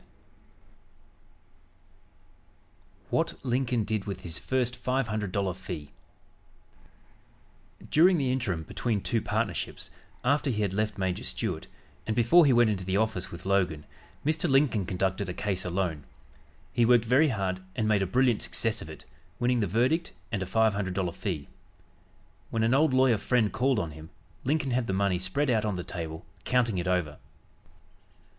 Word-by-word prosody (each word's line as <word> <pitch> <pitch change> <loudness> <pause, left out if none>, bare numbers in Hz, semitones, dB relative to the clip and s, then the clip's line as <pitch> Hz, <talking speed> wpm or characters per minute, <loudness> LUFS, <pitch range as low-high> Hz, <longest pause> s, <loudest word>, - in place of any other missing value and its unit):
WHAT - - +1
LINCOLN 125 -2 +1
DID 105 -1 -2
WITH 100 -3 -5
HIS 85 -2 -5
FIRST 125 -2 0
FIVE 125 0 -1
HUNDRED 105 -3 -2
DOLLAR 100 -2 0
FEE 85 -5 -7 2.0
During 175 +4 +6
the 135 -4 +1
interim 105 -11 -1
between 110 +5 -2
two 115 +2 0
partnerships, - - -2 0.3
after 145 +2 +2
he 105 -4 0
had 100 -2 -1
left 105 +1 -1
Major 95 -2 -1
Stuart, - - -3 0.4
and 110 - 0
before 135 +8 +6
he - - +5
went 120 -2 +5
into 95 -3 -3
the 95 +1 0
office 105 -4 0
with 85 - -10
Logan, 90 -6 +1 0.4
Mr. 155 +2 +1
Lincoln 135 -8 +3
conducted 95 0 -1
a 90 - -4
case 95 -3 -2
alone. 90 -5 -2 0.7
He 120 - +3
worked 120 -1 +5
very 130 +7 +4
hard 95 -7 -1 0.2
and 110 - 0
made 105 -2 +3
a 95 - +1
brilliant 125 +2 +2
success - - -2
of - - -8
it, - - -10 0.3
winning 125 0 +1
the 105 - +1
verdict 125 - +1 0.2
and 100 -5 -1
a 95 - -3
five 110 +1 +3
hundred 95 -2 -2
dollar 95 -3 0
fee. 90 -5 -4 1.0
When 115 -1 0
an 115 +2 +3
old 150 +2 +4
lawyer 130 -3 +4
friend 115 -1 +1
called 130 0 +2
on 85 -6 -2
him, 80 +2 -11 0.4
Lincoln 140 0 +1
had 120 -1 0
the 95 - -1
money 95 -2 +1
spread 125 +10 0
out 110 -3 +2
on 105 -3 -1
the 90 - -4
table 80 -3 -6 0.2
counting 120 -6 +1
it 90 - -3
over. 90 -5 0
110 Hz, 165 wpm, -28 LUFS, 95-125 Hz, 2.0 s, During